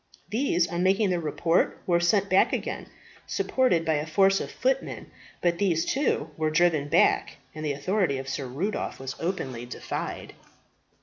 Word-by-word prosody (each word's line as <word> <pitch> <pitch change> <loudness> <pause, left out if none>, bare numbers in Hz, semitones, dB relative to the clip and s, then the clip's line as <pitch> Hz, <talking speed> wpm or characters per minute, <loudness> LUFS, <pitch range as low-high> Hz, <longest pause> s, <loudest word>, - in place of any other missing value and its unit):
These 205 -7 +1
on 170 +1 -3
making 195 +2 +3
their 175 - +1
report 165 +2 0
were 170 -1 +3
sent 190 +3 +2
back 190 0 +3
again, - - -3 0.4
supported 185 -11 +1
by 160 - +2
a 150 +2 -3
force 195 +4 +4
of - - -5
footmen; - - -2 0.3
but 170 -1 +1
these, 175 -5 +1
too, 260 - 0
were 155 -1 +1
driven 155 -2 +2
back, - - +2 0.2
and 155 - -7
the 150 -2 0
authority 175 0 0
of 135 0 -6
Sir 135 0 -3
Rudolph 170 +12 -3
was 135 0 -5
openly 130 -9 -3
defied. - - -5
170 Hz, 165 wpm, -26 LUFS, 150-195 Hz, 0.4 s, force